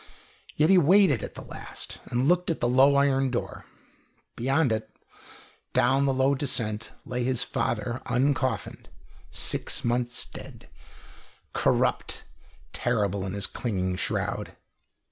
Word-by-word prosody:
Yet 155 Hz, +4 st, +4 dB
he 190 Hz, -, +7 dB
waited 175 Hz, -, +5 dB
at -, -, -7 dB
the -, -, -8 dB
last, -, -, -7 dB
and 125 Hz, +3 st, 0 dB
looked 180 Hz, +1 st, +2 dB
at 165 Hz, -, -1 dB
the 120 Hz, -, +1 dB
low 135 Hz, +3 st, +5 dB
iron 135 Hz, -1 st, +3 dB
door. 120 Hz, -1 st, -4 dB, 0.7 s
Beyond 135 Hz, +2 st, +1 dB
it, 110 Hz, 0 st, -2 dB, 0.8 s
down 135 Hz, +3 st, +3 dB
the 135 Hz, -, +2 dB
long 135 Hz, +1 st, +2 dB
descent, 115 Hz, -6 st, -2 dB
lay 125 Hz, 0 st, -2 dB
his 125 Hz, -1 st, +1 dB
father 120 Hz, +2 st, -2 dB
uncoffined, 130 Hz, -2 st, -1 dB, 0.4 s
six -, -, 0 dB
months 120 Hz, +1 st, 0 dB
dead, -, -, -11 dB, 0.9 s
corrupt, -, -, 0 dB, 0.5 s
terrible 100 Hz, -5 st, 0 dB
in 95 Hz, -, -4 dB
his 100 Hz, -1 st, -1 dB
clinging 95 Hz, -6 st, -2 dB
shroud. -, -, -3 dB
125 Hz, 125 wpm, -27 LUFS, 115-140 Hz, 0.9 s, he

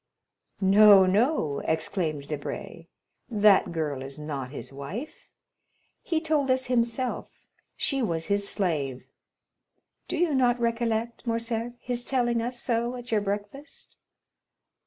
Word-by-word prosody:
"No, 200 Hz, 0 st, +7 dB
no!" 195 Hz, -, +1 dB
exclaimed 160 Hz, -3 st, -2 dB
Debray; 155 Hz, +2 st, -6 dB, 0.4 s
"that 210 Hz, -5 st, +4 dB
girl 150 Hz, -5 st, -2 dB
is 135 Hz, +2 st, -8 dB
not 145 Hz, -4 st, -5 dB
his 140 Hz, 0 st, -8 dB
wife: 180 Hz, -, -7 dB, 0.7 s
he 330 Hz, -2 st, 0 dB
told 310 Hz, -4 st, 0 dB
us 260 Hz, 0 st, +2 dB
himself 245 Hz, 0 st, -1 dB, 0.4 s
she 275 Hz, -2 st, 0 dB
was 165 Hz, -8 st, -1 dB
his 200 Hz, +1 st, 0 dB
slave. 145 Hz, -10 st, -2 dB, 1.0 s
Do -, -, -2 dB
you 335 Hz, -2 st, +2 dB
not 245 Hz, -2 st, +3 dB
recollect, 230 Hz, 0 st, -1 dB
Morcerf, 230 Hz, +1 st, -2 dB
his 245 Hz, -1 st, -3 dB
telling 240 Hz, -3 st, +1 dB
us 240 Hz, +1 st, -3 dB
so 235 Hz, +1 st, -1 dB
at 245 Hz, -1 st, -7 dB
your 215 Hz, -2 st, +2 dB
breakfast?" 205 Hz, +8 st, -6 dB
225 Hz, 120 wpm, -27 LUFS, 165-245 Hz, 1.0 s, No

